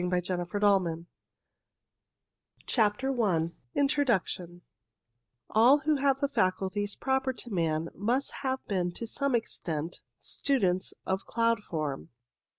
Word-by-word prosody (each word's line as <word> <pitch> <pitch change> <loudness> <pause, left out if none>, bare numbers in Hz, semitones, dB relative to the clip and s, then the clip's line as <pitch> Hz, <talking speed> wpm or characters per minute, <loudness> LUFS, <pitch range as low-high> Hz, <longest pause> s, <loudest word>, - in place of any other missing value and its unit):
OF 180 - 0
mwmm 180 -1 -1
CLOUD 205 0 +4
STUDIES 165 -1 -4 1.6
CHAPTER 245 +3 +1
I 170 -6 +1 0.2
INTRODUCTORY 235 - 0 0.9
All 240 +6 +6
who 305 -1 +2
have 275 -1 +2
the 280 - +1
faculties 200 -4 0
proper 265 0 0
to 240 -1 -8
man 165 -2 0
must 245 +8 0
have 260 -1 -2
been 180 -3 0
to 230 - -5
some 280 +3 0
extent 165 -7 -3 0.2
students 190 -10 0
of 190 0 -2
cloud 230 -1 +1
form. 150 - -4
205 Hz, 120 wpm, -29 LUFS, 175-260 Hz, 1.6 s, All